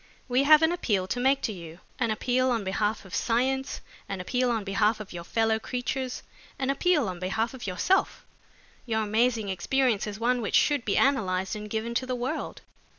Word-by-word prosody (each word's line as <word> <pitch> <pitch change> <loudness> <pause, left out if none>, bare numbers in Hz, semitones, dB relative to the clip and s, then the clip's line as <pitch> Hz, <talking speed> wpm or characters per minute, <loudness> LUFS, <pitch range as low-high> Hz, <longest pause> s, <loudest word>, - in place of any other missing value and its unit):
"We 255 +2 +2
have 310 +1 +7
an 320 - +4
appeal 210 - 0
to 220 +6 -3
make 265 +2 +3
to 220 - -1
you, 170 -2 -10 0.2
an 230 -3 +1
appeal 250 +4 +1
on 230 -4 0
behalf 205 +2 -1
of 190 - -13
science, 265 +3 0 0.3
an 195 -1 -3
appeal 250 +7 0
on 225 -3 0
behalf 210 +3 +1
of 210 -4 -8
your 170 -1 -6
fellow 225 +4 +1
creatures, 255 +2 -3 0.3
an 270 0 0
appeal 300 - +2
on 180 -2 -5
behalf 220 +6 -1
of 250 -5 -7
yourself. 195 - +1 0.6
Your 220 -1 0
amazing 220 0 +1
experience 220 +4 +1
is 210 0 -6
one 245 +1 +1
which 210 - -1
should 290 -5 +3
be 200 - +1
analyzed 190 -8 +1
and 210 0 -7
given 225 +2 -2
to 255 +2 -1
the 255 - -1
world." 255 +6 -4
230 Hz, 195 wpm, -27 LUFS, 205-255 Hz, 0.6 s, have